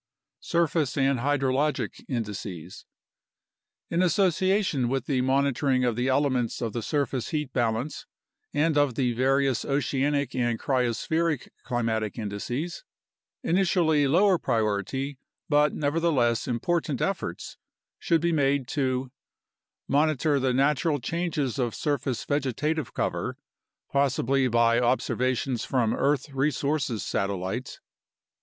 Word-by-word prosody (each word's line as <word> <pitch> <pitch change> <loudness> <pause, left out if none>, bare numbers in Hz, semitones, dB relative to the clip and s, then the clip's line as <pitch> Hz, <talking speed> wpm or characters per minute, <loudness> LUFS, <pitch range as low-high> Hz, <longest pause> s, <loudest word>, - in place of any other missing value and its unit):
Surface 165 -5 0
and 135 -2 +2
Hydrologic 140 +2 0
Indices 100 - -5 1.1
In 170 +1 +2
association 185 - +2
with 135 -1 -1
the 130 -3 +1
monitoring 135 0 +2
of 120 -2 +1
the 125 +2 0
elements 130 -3 +1
of 115 -3 -3
the 120 - -2
surface 135 -1 -1
heat 150 -4 -3
balance, 120 +3 -1 0.4
and 150 0 +2
of 140 -4 +2
the 125 -2 +1
various 135 +1 +2
oceanic 140 0 0
and 120 -3 0
cryospheric 135 +4 0
climatic 110 -4 -1
indices, 120 - -4 0.6
initially 170 -5 +2
lower 185 +5 +4
priority 120 +4 -1 0.3
but 150 0 +3
neverthe 165 +3 +1
less 120 -2 +2
important 140 +3 -1
efforts 195 -1 -3 0.4
should 165 -2 +2
be 170 0 +1
made 140 -4 +1
to 130 -2 -1 0.8
Monitor 145 0 +2
the 130 -1 +1
natural 145 +3 +2
changes 150 -2 -2
of 120 -3 -1
surface 140 -4 -2
vegetative 145 +1 -1
cover, - - -2 0.5
possibly 135 -1 +2
by 115 0 +3
observations 125 0 0
from 120 -4 +1
earth 145 0 0
resources 140 -3 0
satellites. 100 +5 -3
135 Hz, 110 wpm, -26 LUFS, 120-150 Hz, 1.1 s, lower